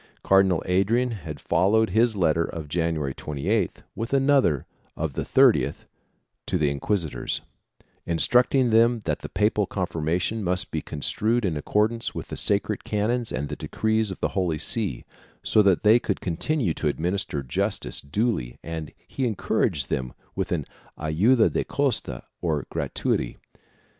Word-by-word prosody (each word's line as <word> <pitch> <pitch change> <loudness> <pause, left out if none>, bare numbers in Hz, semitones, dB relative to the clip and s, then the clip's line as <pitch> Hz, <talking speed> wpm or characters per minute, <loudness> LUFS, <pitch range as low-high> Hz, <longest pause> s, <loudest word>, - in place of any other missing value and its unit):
Cardinal 95 -3 +4
Adrian 110 +7 +2
had 100 -9 -7
followed 105 +5 +2
his 115 +2 +3
letter 85 -3 +2
of 80 -2 -6
January 80 -3 -1
28th 70 -1 -2
'with 115 +4 -5
another 135 - +3 0.3
of 80 -3 -2
the - - -2
30th - - +3 0.6
to - - +1
the 75 -2 +1
inquisitors, 80 +3 -2 0.7
instructing 125 +8 +3
them 115 +1 +4
that - - -2
the - - -7
papal 105 0 +1
confirmation 90 +4 -1
must 90 +4 0
be 80 - -2
construed 110 +12 0
in 85 -4 0
accordance 105 +9 0
with - - -6
the - - -5
sacred 100 0 0
canons 110 +3 -1
and 70 +3 -2
the 75 - -5
decrees 110 +8 0
of 95 - -7
the - - +1
Holy 90 -5 -1
See, 80 - -1 0.4
so 110 - +4
that 100 -1 +3
they 110 +3 +6
could 100 - -2
continue 95 - -1
to 75 -2 0
admin 85 +5 -2
ister 75 -8 -2
justice 65 - -1
duly 70 - -1
and 80 -2 -5 0.2
he 130 -2 -2
encouraged 75 - 0
them 65 -1 -2 0.2
with - - -2
an - - -1 0.3
ayuda 100 +11 +3
de - - +1
costa 130 - -1 0.2
or 75 -5 -1
gratuity. - - -1
95 Hz, 150 wpm, -25 LUFS, 80-110 Hz, 0.7 s, they